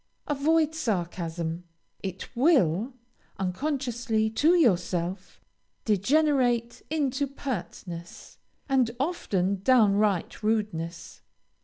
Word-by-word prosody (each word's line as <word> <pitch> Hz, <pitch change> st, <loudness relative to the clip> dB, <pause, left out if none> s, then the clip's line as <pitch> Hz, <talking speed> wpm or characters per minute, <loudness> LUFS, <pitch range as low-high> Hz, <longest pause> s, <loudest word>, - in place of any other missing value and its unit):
Avoid 310 Hz, +2 st, +2 dB
sarcasm; 175 Hz, -, -3 dB, 0.4 s
it 190 Hz, +5 st, -6 dB
will, 240 Hz, -, +3 dB, 0.4 s
unconsciously 230 Hz, +1 st, -1 dB
to 310 Hz, +10 st, +4 dB
yourself, 180 Hz, -, 0 dB, 0.5 s
degenerate 245 Hz, +2 st, +2 dB
into 285 Hz, -2 st, 0 dB
pertness, 180 Hz, -10 st, -7 dB, 0.3 s
and 265 Hz, -4 st, +3 dB
often 200 Hz, -, -1 dB
downright 210 Hz, -6 st, +3 dB
rudeness. 205 Hz, -7 st, -2 dB
220 Hz, 70 wpm, -27 LUFS, 180-275 Hz, 0.5 s, to